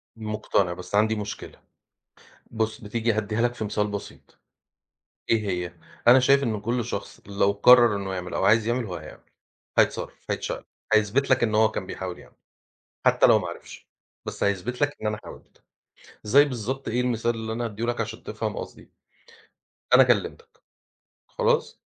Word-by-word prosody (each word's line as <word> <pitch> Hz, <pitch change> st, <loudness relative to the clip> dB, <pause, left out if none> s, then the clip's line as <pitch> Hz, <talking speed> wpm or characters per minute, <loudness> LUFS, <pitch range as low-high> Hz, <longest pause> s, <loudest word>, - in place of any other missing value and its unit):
مقتنع 105 Hz, -4 st, -1 dB
بس 90 Hz, +3 st, -6 dB
عندي 110 Hz, +1 st, +3 dB
مشكلة. 105 Hz, -1 st, -7 dB, 0.9 s
بُص 110 Hz, -1 st, -2 dB
بتيجي 115 Hz, +2 st, -1 dB
هادّيها 110 Hz, +1 st, -1 dB
لك 120 Hz, 0 st, +1 dB
في 120 Hz, -, -5 dB
مثال 105 Hz, 0 st, -1 dB
بسيط 100 Hz, -1 st, -9 dB, 0.9 s
إيه 110 Hz, -3 st, +2 dB
هي، 90 Hz, -1 st, -3 dB, 0.4 s
أنا 125 Hz, +2 st, +8 dB
شايف 140 Hz, +2 st, +4 dB
إن 110 Hz, -5 st, -1 dB
كل 120 Hz, +3 st, -1 dB
شخص 100 Hz, -4 st, -6 dB
لو 100 Hz, 0 st, +1 dB
قرر 120 Hz, +1 st, +6 dB
إنه 95 Hz, -1 st, -4 dB
يعمل 90 Hz, -1 st, -5 dB
أو -, -, 0 dB
عايز 110 Hz, +2 st, +4 dB
يعمل 120 Hz, +1 st, 0 dB
هو 95 Hz, -5 st, -6 dB
هيعمل. 75 Hz, -2 st, -10 dB, 0.6 s
هيتصرف، -, -, 0 dB
هيتشقلب، -, -, -4 dB, 0.3 s
هيثبت 110 Hz, +6 st, +2 dB
لك 130 Hz, -1 st, +3 dB
إن 110 Hz, -2 st, +1 dB
هو 110 Hz, 0 st, +4 dB
كان 100 Hz, -, -4 dB
بيحاول 95 Hz, -1 st, -6 dB
يعمل -, -, -17 dB, 0.7 s
حتى -, -, +5 dB
لو -, -, +6 dB
ما -, -, -5 dB
عرِفش. -, -, -10 dB, 0.4 s
بس -, -, -4 dB
هيثبت 100 Hz, +7 st, -1 dB
لك 145 Hz, 0 st, +1 dB
إن 110 Hz, -, -1 dB
أنا 105 Hz, 0 st, -1 dB
حاولت. -, -, -14 dB, 0.6 s
زَي 140 Hz, +7 st, +6 dB
بالضبط 130 Hz, 0 st, -4 dB
إيه 120 Hz, +2 st, 0 dB
المثال 120 Hz, -1 st, 0 dB
اللي 110 Hz, 0 st, -5 dB
أنا 120 Hz, +1 st, -2 dB
أدّيه 110 Hz, +1 st, -5 dB
لك 120 Hz, 0 st, -1 dB
عشان -, -, -5 dB
تفهم -, -, -4 dB
قصدي. -, -, -9 dB, 1.1 s
أنا -, -, +8 dB
كلمتك. 460 Hz, 0 st, -1 dB, 0.7 s
خلاص؟ 485 Hz, -1 st, 0 dB
110 Hz, 165 wpm, -25 LUFS, 100-120 Hz, 1.1 s, أنا